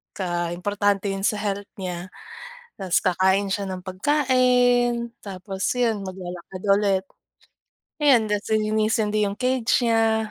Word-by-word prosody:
ka 175 Hz, -2 st, -2 dB
importante 205 Hz, +1 st, 0 dB
yun 195 Hz, 0 st, -4 dB
sa 210 Hz, -1 st, +1 dB
health 200 Hz, -1 st, -3 dB
niya. 180 Hz, -1 st, -5 dB, 0.7 s
'Tas 185 Hz, -2 st, +1 dB
kakain 190 Hz, +2 st, +2 dB
siya 200 Hz, 0 st, -1 dB
ng 185 Hz, -1 st, -5 dB
pagkain, 245 Hz, +1 st, +2 dB
tapos 195 Hz, 0 st, -5 dB
'yun, 225 Hz, -4 st, +1 dB
maglalakad 185 Hz, 0 st, -8 dB
ulit 195 Hz, -2 st, +1 dB, 1.0 s
ayon 250 Hz, -7 st, +5 dB
'tas 210 Hz, -1 st, -1 dB
lilinisin 215 Hz, +1 st, +1 dB
din 210 Hz, -1 st, +2 dB
yung 205 Hz, -, -11 dB
cage 255 Hz, -2 st, +1 dB
niya, 225 Hz, -1 st, +2 dB
205 Hz, 130 wpm, -23 LUFS, 190-225 Hz, 1.0 s, ayon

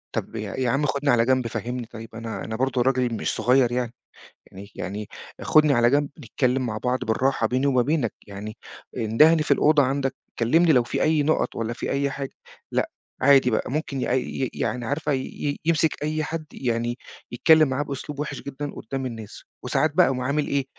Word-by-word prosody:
طَب -, -, -3 dB
يا 105 Hz, -2 st, -4 dB
يا 130 Hz, -2 st, 0 dB
عم 135 Hz, +5 st, +1 dB
خُدني 140 Hz, +1 st, 0 dB
على 115 Hz, -1 st, +4 dB
جنب 130 Hz, -1 st, +2 dB
فهمّني 120 Hz, +1 st, -4 dB
طيب، 115 Hz, 0 st, -10 dB
أنا 115 Hz, -1 st, -5 dB
أنا 110 Hz, -, -4 dB
برضه 130 Hz, 0 st, 0 dB
راجل 125 Hz, -2 st, +1 dB
مش 110 Hz, -, -2 dB
صغير 125 Hz, -1 st, +3 dB
يعني 120 Hz, -1 st, -2 dB, 0.6 s
يعني 100 Hz, +1 st, -11 dB
يعني 100 Hz, +2 st, -5 dB, 0.3 s
خُدني 155 Hz, -2 st, +4 dB
على 120 Hz, -1 st, +4 dB
جنب، 145 Hz, +1 st, +2 dB
نتكلم 130 Hz, 0 st, 0 dB
مع 110 Hz, -2 st, -3 dB
بعض 125 Hz, +3 st, -1 dB
بالراحة 115 Hz, +1 st, +1 dB
بيني 130 Hz, +4 st, +1 dB
وما 130 Hz, -3 st, +3 dB
بينك، 140 Hz, -3 st, 0 dB
يعني 105 Hz, +2 st, -7 dB, 0.4 s
اندهني 155 Hz, +9 st, +4 dB
في -, -, -2 dB
الأوضة 150 Hz, -2 st, +5 dB
عندك، 135 Hz, 0 st, -1 dB, 0.2 s
كلّمني 160 Hz, +8 st, +4 dB
لو 125 Hz, -2 st, +4 dB
في 120 Hz, -, -3 dB
أي 155 Hz, -2 st, +3 dB
نُقَط 155 Hz, +2 st, +1 dB
والَّا 115 Hz, +1 st, -2 dB
في -, -, -4 dB
أي 140 Hz, 0 st, +1 dB
حاجة، 135 Hz, -1 st, -5 dB, 0.4 s
لأ، -, -, 0 dB, 0.3 s
عادي 135 Hz, -2 st, +5 dB
بقى 110 Hz, -, -1 dB
ممكن 140 Hz, -3 st, -2 dB
ي -, -, 0 dB, 0.4 s
ي 130 Hz, -, 0 dB
يعني 125 Hz, -2 st, -2 dB
عارفة 145 Hz, +3 st, -1 dB
ي 145 Hz, +2 st, -3 dB
يمسك 160 Hz, -2 st, +1 dB
أي 155 Hz, +1 st, -1 dB
حد 155 Hz, 0 st, -4 dB
يعني 120 Hz, -1 st, -2 dB, 0.3 s
يتكلم 155 Hz, +4 st, +5 dB
معاه 130 Hz, +3 st, 0 dB
بأسلوب 140 Hz, +1 st, -6 dB
وِحِش 150 Hz, -, -4 dB
جدًا 140 Hz, +1 st, -5 dB
قُدّام 135 Hz, +3 st, -5 dB
الناس، 115 Hz, -4 st, -8 dB, 0.2 s
وساعات 155 Hz, -, +1 dB
بقى 180 Hz, -, +6 dB
يقوم 125 Hz, -1 st, -1 dB
عامل 145 Hz, +3 st, 0 dB
إيه، 140 Hz, -2 st, 0 dB
130 Hz, 195 wpm, -24 LUFS, 120-145 Hz, 0.6 s, بقى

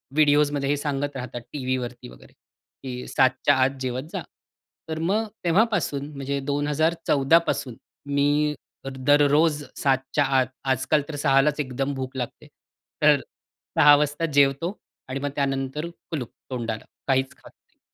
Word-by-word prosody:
व्हिडिओसमध्ये 145 Hz, -2 st, +3 dB
हे 145 Hz, -, +2 dB
सांगत 145 Hz, -1 st, -2 dB
राहतात 125 Hz, -1 st, -5 dB
टीव्हीवरती 125 Hz, -, -3 dB
वगैरे, 60 Hz, 0 st, -16 dB, 0.5 s
की 125 Hz, -1 st, -6 dB
7:00च्या 130 Hz, +2 st, +3 dB
आत 130 Hz, -, +4 dB
जेवत 130 Hz, +1 st, -2 dB
जा. -, -, -2 dB, 0.7 s
तर 160 Hz, -, -3 dB
मग 200 Hz, +7 st, +1 dB, 0.2 s
तेव्हापासून 175 Hz, -6 st, +1 dB
म्हणजे 140 Hz, 0 st, -2 dB
2014 145 Hz, +1 st, +2 dB
पासून 125 Hz, -4 st, -2 dB, 0.4 s
मी 145 Hz, +1 st, +2 dB, 0.4 s
दररोज 145 Hz, +3 st, +3 dB
7:00च्या 135 Hz, +1 st, +1 dB
आत, 130 Hz, -1 st, +2 dB, 0.2 s
आजकाल 135 Hz, +3 st, +1 dB
तर 150 Hz, -, -5 dB
6:00लाच 145 Hz, +1 st, +3 dB
एकदम 135 Hz, 0 st, -2 dB
भूक 130 Hz, 0 st, -5 dB
लागते, 125 Hz, -, -5 dB, 0.5 s
तर -, -, +6 dB, 0.6 s
6:00 145 Hz, 0 st, +8 dB
वाजता 150 Hz, +2 st, 0 dB
जेवतो 140 Hz, +5 st, +3 dB, 0.4 s
आणि 135 Hz, -, -3 dB
मग 145 Hz, +1 st, -2 dB
त्यानंतर 135 Hz, +2 st, -1 dB, 0.2 s
कुलूप 135 Hz, -8 st, -4 dB, 0.2 s
तोंडाला. 115 Hz, -3 st, -3 dB, 0.2 s
काहीच 135 Hz, +1 st, +1 dB
खात -, -, -16 dB
नाही. -, -, -44 dB
140 Hz, 130 wpm, -24 LUFS, 130-150 Hz, 0.7 s, 6:00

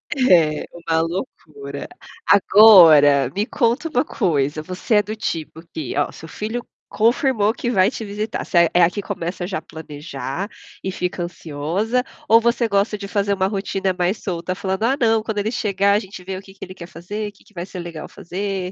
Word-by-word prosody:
É 170 Hz, -, +3 dB
uma 165 Hz, -1 st, -1 dB
loucura. 195 Hz, -, -6 dB, 0.4 s
Agora, 165 Hz, -, +7 dB
me 205 Hz, -, 0 dB
conta 240 Hz, +6 st, 0 dB
uma 310 Hz, -, +1 dB
coisa, 155 Hz, -, 0 dB
você 185 Hz, +6 st, -2 dB
é 210 Hz, -, +4 dB
do 210 Hz, +2 st, -5 dB
tipo 165 Hz, -5 st, -4 dB
que 160 Hz, -, -4 dB
ó, -, -, +1 dB
seu 160 Hz, -, -11 dB
filho 225 Hz, +3 st, -5 dB, 0.2 s
confirmou 225 Hz, -1 st, +2 dB
que 240 Hz, -1 st, -3 dB
vai 195 Hz, -2 st, +3 dB
te 225 Hz, -, -6 dB
visitar, 210 Hz, +2 st, -4 dB
você 170 Hz, -3 st, +3 dB
é 175 Hz, -, +4 dB
a 170 Hz, -, +5 dB
que 205 Hz, +3 st, -5 dB
começa 180 Hz, -2 st, -4 dB
já 190 Hz, +1 st, -4 dB
planejar 150 Hz, +3 st, -6 dB, 0.3 s
e -, -, -3 dB
fica 180 Hz, -1 st, -3 dB
ansiosa 170 Hz, +8 st, -2 dB, 0.3 s
ou 225 Hz, -, +8 dB
você 235 Hz, 0 st, +1 dB
gosta 200 Hz, +1 st, +1 dB
de 200 Hz, -, -7 dB
fazer 200 Hz, 0 st, 0 dB
uma 190 Hz, -1 st, +1 dB
rotina 195 Hz, -1 st, -2 dB
mais 180 Hz, +4 st, -1 dB
solta 180 Hz, -1 st, -3 dB
falando: 190 Hz, +2 st, -3 dB
"Ah, 265 Hz, +4 st, +2 dB
não, 225 Hz, -2 st, +2 dB
quando 215 Hz, -1 st, -3 dB
ele 215 Hz, +3 st, -1 dB
chegar 200 Hz, -4 st, +1 dB
a 205 Hz, -, +3 dB
gente 190 Hz, -3 st, -10 dB
vê 190 Hz, +1 st, -5 dB
o -, -, -8 dB
que 195 Hz, 0 st, -16 dB
que 195 Hz, -, -12 dB
ele 185 Hz, -, -8 dB
quer 175 Hz, -2 st, -10 dB
fazer, 205 Hz, +5 st, -6 dB
que 205 Hz, -, -24 dB
que -, -, -25 dB
vai 175 Hz, 0 st, -5 dB
ser 185 Hz, -1 st, -8 dB
legal 170 Hz, -2 st, -7 dB
fazer". 190 Hz, 0 st, -4 dB
195 Hz, 195 wpm, -21 LUFS, 170-215 Hz, 0.4 s, ou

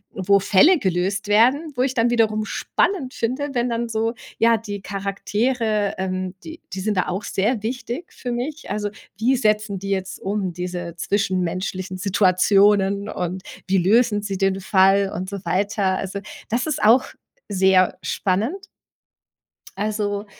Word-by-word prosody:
wo 195 Hz, +1 st, +3 dB
Fälle 210 Hz, -, +5 dB
gelöst 190 Hz, -, -1 dB
werden, 255 Hz, +9 st, +3 dB
wo 250 Hz, -, 0 dB
ich 260 Hz, 0 st, 0 dB
dann 235 Hz, 0 st, +2 dB
wiederum 215 Hz, -2 st, +2 dB
spannend 280 Hz, -, -1 dB
finde, 260 Hz, +5 st, -2 dB
wenn 240 Hz, -1 st, 0 dB
dann 235 Hz, 0 st, -2 dB
so 225 Hz, +1 st, -1 dB, 0.2 s
ja, 230 Hz, 0 st, +4 dB
die 205 Hz, -2 st, -6 dB
Charaktere, 205 Hz, +2 st, -1 dB
ähm, 185 Hz, -1 st, -3 dB
die 325 Hz, +1 st, -10 dB
die 190 Hz, -, -4 dB
sind 205 Hz, 0 st, -1 dB
da 185 Hz, -, +1 dB
auch 190 Hz, +3 st, -3 dB
sehr 215 Hz, +3 st, -1 dB
wichtig 245 Hz, +6 st, -5 dB
für 250 Hz, -, -5 dB
mich. 270 Hz, +6 st, -4 dB
Also, 205 Hz, +1 st, -2 dB, 0.3 s
wie 240 Hz, +5 st, +2 dB
setzen 215 Hz, -4 st, 0 dB
die 195 Hz, +1 st, -6 dB
jetzt 190 Hz, -1 st, -2 dB
um, 195 Hz, -2 st, -2 dB
diese 175 Hz, -1 st, -5 dB
zwischenmenschlichen 185 Hz, 0 st, -2 dB
Situationen 200 Hz, +1 st, +3 dB
und 180 Hz, +1 st, -3 dB, 0.3 s
wie 190 Hz, 0 st, +3 dB
lösen 210 Hz, +3 st, +3 dB
sie 200 Hz, -2 st, -3 dB
den 195 Hz, 0 st, 0 dB
Fall 195 Hz, +1 st, +3 dB
und 185 Hz, +2 st, -4 dB
so 200 Hz, -1 st, -6 dB
weiter. 190 Hz, +1 st, 0 dB
Also, 195 Hz, +1 st, -4 dB, 0.3 s
das 240 Hz, +6 st, -1 dB
ist 300 Hz, -8 st, -2 dB
auch 235 Hz, +5 st, +6 dB, 0.4 s
sehr 190 Hz, -1 st, +3 dB
spannend. 215 Hz, -, -1 dB, 1.1 s
Also 205 Hz, 0 st, -2 dB
205 Hz, 150 wpm, -22 LUFS, 190-230 Hz, 1.1 s, auch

